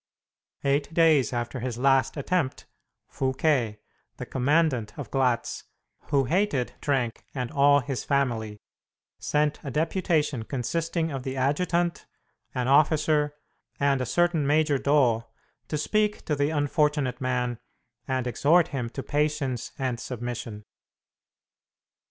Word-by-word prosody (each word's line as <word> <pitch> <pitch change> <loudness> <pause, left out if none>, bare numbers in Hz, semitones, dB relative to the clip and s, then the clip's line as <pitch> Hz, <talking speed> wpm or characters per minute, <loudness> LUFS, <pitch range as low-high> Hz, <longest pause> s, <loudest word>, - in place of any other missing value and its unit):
Eight 140 +2 +1
days 160 -5 +4
after 120 +1 -3
his 120 -1 -4
last 135 +1 +2
attempt, 150 -1 -1 0.4
Fouquet, 130 -4 0 0.4
the - - -5
commandant 130 -4 +1
of 145 - -7
Glatz, 130 -3 0 0.4
who 140 -2 +2
hated 155 -3 0
Trenck 130 -5 -1
and 125 -2 -3
all 145 0 +5
his 130 -1 -4
family, 120 -7 -1 0.6
sent 150 0 0
a 140 - -4
deputation 155 -2 0
consisting 160 +7 -2
of 135 -2 -4
the 130 +1 -5
adjutant, 170 +6 0 0.5
an 125 -1 -1
officer, 150 +1 +3 0.4
and 140 -2 +2
a 125 - -2
certain 170 +1 +2
Major 150 -1 +3
Doo 130 -6 +3 0.4
to 155 - -2
speak 210 +7 0
to 150 - 0
the 145 +1 +1
unfortunate 145 -3 0
man 125 -2 -1 0.5
and 130 -1 -1
exhort 160 +7 +3
him 125 -6 -3
to 135 +3 -6
patience 145 -4 -1
and 130 -3 -2
submission. 115 -3 -6
140 Hz, 120 wpm, -26 LUFS, 125-150 Hz, 0.6 s, all